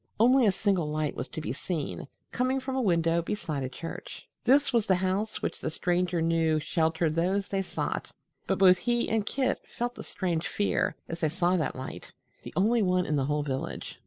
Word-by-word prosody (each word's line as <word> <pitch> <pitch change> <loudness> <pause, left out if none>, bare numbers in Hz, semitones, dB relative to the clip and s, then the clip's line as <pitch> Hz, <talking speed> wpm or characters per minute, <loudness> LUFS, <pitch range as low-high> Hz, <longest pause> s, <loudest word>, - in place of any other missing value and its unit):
Only 250 +1 +6
a - - +5
single 190 -5 0
light 150 -1 -1
was 125 - -4
to 160 - -6
be 125 - -3
seen, 150 -1 -4 0.2
coming 255 +2 +1
from 265 0 -4
a 265 - +1
window 170 -5 +2
beside 165 -6 -3
a 130 - -2
church. 165 +6 -8 0.2
This 275 +2 +4
was 230 -3 +2
the 190 - +5
house 190 +4 -1
which - - -2
the - - -2
Stranger 175 +1 0
knew 165 -1 +2
sheltered 160 0 +1
those 190 +5 +1
they 195 -1 -1
sought, 190 - -3 0.4
but - - +1
both 185 -1 +6
he 240 +5 +1
and 215 -1 0
Kit 265 -2 0 0.2
felt 240 +1 -2
a - - -5
strange 175 -4 -2
fear 205 - 0
as 165 - -5
they 160 - +1
saw 175 +2 +1
that 160 -4 -1
light 130 0 -7 0.3
the - - -8
only 225 +5 +3
one 180 -2 +2
in 150 - 0
the 135 -2 +1
whole 150 +1 0
village. 135 -2 -4
180 Hz, 205 wpm, -28 LUFS, 160-210 Hz, 0.4 s, Only